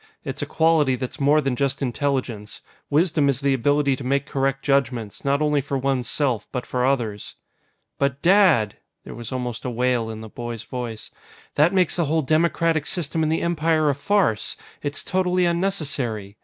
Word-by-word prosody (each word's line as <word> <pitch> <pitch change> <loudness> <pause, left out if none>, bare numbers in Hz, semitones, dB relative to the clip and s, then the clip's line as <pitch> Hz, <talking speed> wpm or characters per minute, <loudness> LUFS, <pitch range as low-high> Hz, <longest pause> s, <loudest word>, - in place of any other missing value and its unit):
It's - - -4
a - - -3
quality 160 -5 +3
that's 130 0 -5
more 145 +2 +4
than 135 -3 -1
just 140 0 -1
intelligence; 125 -6 -2 0.3
wisdom 150 -1 +2
is 135 -2 +1
the 140 -1 +2
ability 140 +2 +2
to 135 - -8
make 140 +2 0
correct 135 -1 -1
judgments, 125 -6 0
not 140 +2 +1
only 150 -1 +2
for 140 0 -3
one's 130 -2 -1
self, 130 -7 0
but 125 - -3
for 125 -1 -1
others." 120 -6 -1 0.6
"But, 140 -1 0
Dad!" 175 - +4 0.3
There - - -9
was 120 -2 -8
almost 125 -2 -4
a 125 - -2
wail 120 -1 0
in 110 0 -6
the 110 - -8
boy's 120 0 -6
voice. 120 -3 -6 0.4
"That 150 +4 +4
makes 185 -2 +2
the 170 - +2
whole 160 +2 +1
democratic 160 +1 +1
system 165 -2 -1
in 155 - +1
the 160 - 0
Empire 160 -2 +2
a - - -1
farce! 145 - 0 0.2
It's 145 0 -3
totally 185 -1 +1
unnecessary! 145 - -1
140 Hz, 180 wpm, -23 LUFS, 125-155 Hz, 0.6 s, more